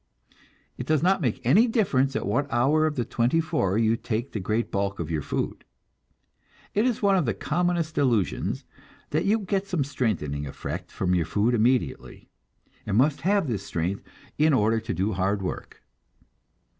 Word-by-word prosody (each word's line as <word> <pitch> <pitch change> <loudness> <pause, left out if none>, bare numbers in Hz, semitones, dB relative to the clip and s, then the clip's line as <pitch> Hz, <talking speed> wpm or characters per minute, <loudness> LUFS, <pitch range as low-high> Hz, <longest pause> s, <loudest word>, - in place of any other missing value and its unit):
It - - -5
does 155 -1 +2
not 190 +1 +3
make 130 -1 -2
any 195 - +5
difference 140 - +1
at - - -1
what 145 +2 -1
hour 145 +7 +3
of 150 - -3
the 120 - -1
twenty 120 +7 +1
four 100 - 0
you 115 0 +3
take 115 +2 -3
the 110 - -3
great 110 +5 -1
bulk 100 0 -1
of 85 -1 -4
your 80 -2 -1
food. - - -3 1.1
It 210 +3 +2
is 240 -4 -1
one 200 -1 +4
of 180 -5 +2
the 115 - 0
commonest 170 - -1
delusions 120 - 0 0.5
that 155 +5 0
you 210 +3 +3
get 195 0 -1
some 175 -7 0
strengthening 85 - -2
effect - - -6
from 90 -1 -1
your 85 -3 +1
food 105 +8 +1
immediately, 120 +2 0 0.5
and 100 0 -1
must 140 +3 +3
have 195 +2 +2
this 110 -6 -2
strength 90 +3 -2 0.4
in 155 0 +4
order 110 -2 +3
to 110 - -5
do 95 +5 0
hard 95 +2 0
work. 90 - -6
125 Hz, 175 wpm, -26 LUFS, 100-155 Hz, 1.1 s, any